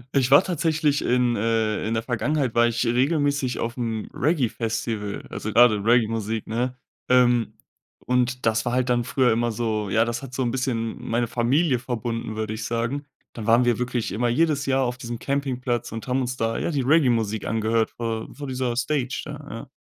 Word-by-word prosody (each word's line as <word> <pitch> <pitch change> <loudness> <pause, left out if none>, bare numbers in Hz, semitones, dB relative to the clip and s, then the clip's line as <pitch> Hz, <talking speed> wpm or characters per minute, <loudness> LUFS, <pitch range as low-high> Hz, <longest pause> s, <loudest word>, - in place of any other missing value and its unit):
Ich 130 -2 +3
war 140 +1 +7
tatsächlich 155 -4 0
in, 125 -1 +2
äh 110 -1 0
in 115 - -1
der 110 - -1
Vergangenheit 130 +2 -1
war 120 0 +4
ich 120 +1 -1
regelmäßig 140 +1 +1
aufm 115 -2 -3
Reggae 145 -3 +1
Festival, 110 -2 -3
also, 110 - -4
grade 110 -2 +5
Reggae-Musik, 115 -1 +1
ne? 125 +3 -2 0.3
Ähm, 125 -2 +4 0.5
und 125 0 0
das 115 0 +2
war 120 - -2
halt 125 0 +1
dann 120 -1 +1
früher 125 0 +2
immer 120 +1 +1
so 110 -2 -2
ja, 110 +4 +3
das 120 0 -3
hat 130 -2 -8
so 130 - 0
'n 120 - 0
bisschen 120 -3 -2
meine 120 +1 0
Familie 125 +4 +1
verbunden, 115 -2 -4
würde 110 0 -3
ich 110 +1 -5
sagen. 120 +4 -2 0.3
Dann 110 -2 -7
waren 120 +2 +5
wir 120 -2 +2
wirklich 125 -2 -2
immer 120 +4 0
jedes 140 +2 +1
Jahr 135 0 +2
auf 125 -1 -2
diesem 120 -1 -5
Campingplatz 125 -3 -2
und 115 +2 -6
haben 130 +1 +1
uns 125 0 -3
da, 115 0 -1
ja, - - -1
die 145 -5 0
Reggae-Musik 120 -7 +2
angehört 110 0 +1
vor 115 -1 -4
vor 145 - -7
dieser 130 -2 -2
Stage 130 0 -1
da, 150 -1 -8
ja. 115 - -7
120 Hz, 190 wpm, -24 LUFS, 115-130 Hz, 0.5 s, war